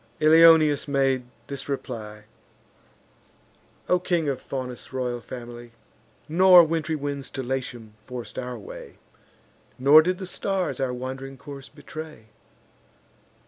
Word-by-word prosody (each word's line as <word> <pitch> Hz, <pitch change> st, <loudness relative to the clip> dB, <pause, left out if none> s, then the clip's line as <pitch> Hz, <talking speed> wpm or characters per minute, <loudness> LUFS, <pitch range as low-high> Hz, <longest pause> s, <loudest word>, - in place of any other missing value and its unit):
Ilioneus 155 Hz, -2 st, +6 dB
made 135 Hz, -2 st, +1 dB, 0.2 s
this 140 Hz, +1 st, -7 dB
reply: 110 Hz, -6 st, -6 dB, 1.6 s
"O 180 Hz, -, +3 dB
king, 175 Hz, -3 st, 0 dB
of 130 Hz, -2 st, -3 dB
Faunus' 125 Hz, -2 st, -6 dB
royal 125 Hz, -2 st, -3 dB
family! 120 Hz, -1 st, -10 dB, 0.5 s
Nor 180 Hz, +2 st, +7 dB
wintry 160 Hz, 0 st, -1 dB
winds 140 Hz, -2 st, -4 dB
to 135 Hz, -, -5 dB
Latium 120 Hz, -4 st, -5 dB
forc'd 125 Hz, +1 st, -7 dB
our 125 Hz, -1 st, -5 dB
way, 105 Hz, -, -11 dB, 0.8 s
Nor 140 Hz, +4 st, +7 dB
did 180 Hz, +3 st, -1 dB
the 190 Hz, -, -6 dB
stars 185 Hz, -1 st, -2 dB
our 130 Hz, -2 st, 0 dB
wand'ring 130 Hz, +2 st, -6 dB
course 140 Hz, 0 st, -10 dB
betray. 155 Hz, -8 st, -10 dB
135 Hz, 115 wpm, -25 LUFS, 125-155 Hz, 1.6 s, Nor